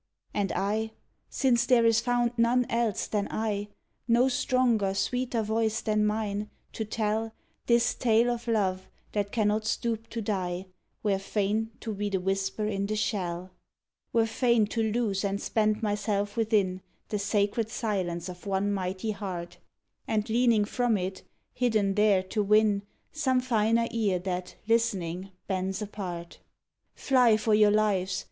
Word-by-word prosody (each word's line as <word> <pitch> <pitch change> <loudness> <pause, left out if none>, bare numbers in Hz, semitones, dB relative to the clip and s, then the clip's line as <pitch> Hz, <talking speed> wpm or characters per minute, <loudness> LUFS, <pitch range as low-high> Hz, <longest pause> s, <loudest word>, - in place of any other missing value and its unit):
And 200 -2 0
I 215 +4 -1 0.4
since 245 -3 +2
there 245 -3 +5
is 230 -1 +5
found 245 -1 +1
none 240 +2 +3
else 230 -3 0
than 205 -2 -1
I, 210 -2 -2 0.4
No 240 +2 +4
stronger, 240 -6 +1
sweeter 245 +1 0
voice 220 +1 0
than 215 -2 +1
mine, 210 -1 -2 0.2
to 220 - -3
tell 220 +1 -2 0.3
This 235 0 +3
tale 235 0 +3
of 240 0 -5
love 190 -5 0 0.2
that 205 -1 -1
cannot 215 -1 +1
stoop 225 -1 -2
to 230 - -4
die 185 -4 -2 0.4
Were 200 -2 +1
fain 210 +2 -1
to 220 - -4
be 205 +1 -2
the 195 -1 0
whisper 195 +3 -1
in 200 -1 -1
the 215 - -1
shell; 185 -4 -2 0.6
Were 230 -1 +3
fain 235 0 +2
to 230 - 0
lose 215 -4 0
and 200 0 -1
spend 215 0 0
myself 205 -1 -1
within 210 -5 +1 0.3
The 210 - -1
sacred 205 +2 0
silence 190 -7 -2
of 180 +2 -9
one 200 +1 0
mighty 190 +2 -2
heart, 180 -4 -6 0.5
And 215 -1 0
leaning 230 -2 +3
from 240 0 +1
it, 190 0 -4 0.3
hidden 220 -5 +1
there, 205 -2 +3
to 200 +3 -2
win 210 0 +3 0.3
Some 265 -5 +1
finer 230 -2 +2
ear 215 -5 +1
that, 180 0 -4
listening, 195 -6 0 0.2
bends 190 +1 -2
apart. 180 -5 -6 0.6
"Fly 250 -5 +4
for 215 0 +1
your 210 0 +6
lives!" 205 -3 +1
210 Hz, 150 wpm, -28 LUFS, 195-230 Hz, 0.6 s, your